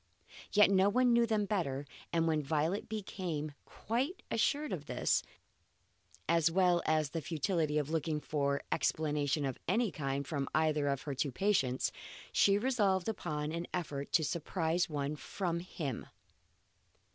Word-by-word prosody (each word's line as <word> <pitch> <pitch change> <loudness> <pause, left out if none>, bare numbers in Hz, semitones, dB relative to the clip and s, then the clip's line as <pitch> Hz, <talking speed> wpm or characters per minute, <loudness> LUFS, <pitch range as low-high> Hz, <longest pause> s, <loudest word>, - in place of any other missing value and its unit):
Yet 210 -1 +6
no 195 +1 +5
one 250 +3 +4
knew 235 0 +4
them 215 -2 +1
better, 145 -10 -1 0.3
and 165 -1 +2
when 155 -1 +2
Violet 155 +9 -1
became 180 -8 -3
quite 265 - -2
assured 290 +6 +1
of 150 -5 -5
this, - - +1 1.1
as 165 -1 +4
well 180 0 +3
as 155 -2 +2
of - - -29
the 165 - -2
futility 155 0 0
of 150 0 -1
looking 160 -1 0
for 140 -2 -1
explanation 150 -2 +1
of 135 -2 -3
any 220 +3 +2
kind 140 -1 -2
from 140 -2 -2
either 155 -2 +2
of 140 -2 -1
her 145 - -3
two 140 +1 -1
patients, 135 - +1 0.4
she 200 0 +4
resolved 205 -6 +1
upon 155 -8 -2
an 170 +1 -3
effort 145 -5 -4
to 160 - +4
surprise 165 +2 0
one 145 -1 -2
from 170 +2 -3
him. 155 -7 -5
165 Hz, 150 wpm, -33 LUFS, 145-195 Hz, 1.1 s, Yet